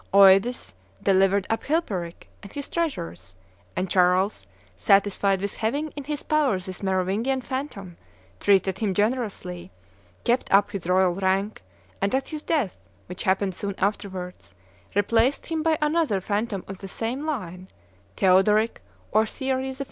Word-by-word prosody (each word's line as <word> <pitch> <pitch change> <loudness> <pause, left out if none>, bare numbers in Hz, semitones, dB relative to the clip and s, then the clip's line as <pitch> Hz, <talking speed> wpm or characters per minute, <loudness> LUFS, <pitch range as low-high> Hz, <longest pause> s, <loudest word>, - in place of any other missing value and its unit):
Eudes 195 - +5 0.3
delivered 195 0 +3
up 225 - 0
Chilperic 200 - -2
and 200 - -11
his 285 -1 -5
treasures; 95 - -4 0.4
and 185 - -1
Charles, 185 +2 +2 0.3
satisfied 195 -1 +3
with 200 +1 -3
having 285 +8 -1
in 285 -2 -8
his 295 0 -3
power 300 -9 +2
this 185 0 -8
Merovingian 195 +7 0
phantom, 245 - -5 0.4
treated 190 -1 +2
him 200 -4 0
generously, 205 - -2 0.5
kept 245 +2 +1
up 200 +1 +4
his 195 -5 -5
royal 185 0 +3
rank, 195 +3 0 0.4
and 200 +5 +1
at 265 - -2
his 310 -2 -5
death, 290 - -1 0.3
which 180 - -8
happened 190 0 +1
soon 200 +2 -4
afterwards, 185 - -3 0.4
replaced 230 +6 +2
him 325 -1 -2
by 320 0 +2
another 300 - +1
phantom 205 0 -2
of 195 -1 -8
the 195 - -7
same 235 +8 -3
line, 185 - -4 0.5
Theodoric 210 +4 +3 0.3
or 220 +1 +3
Thierry 265 +1 -2
IV. 265 0 -8
200 Hz, 140 wpm, -25 LUFS, 190-260 Hz, 0.5 s, Eudes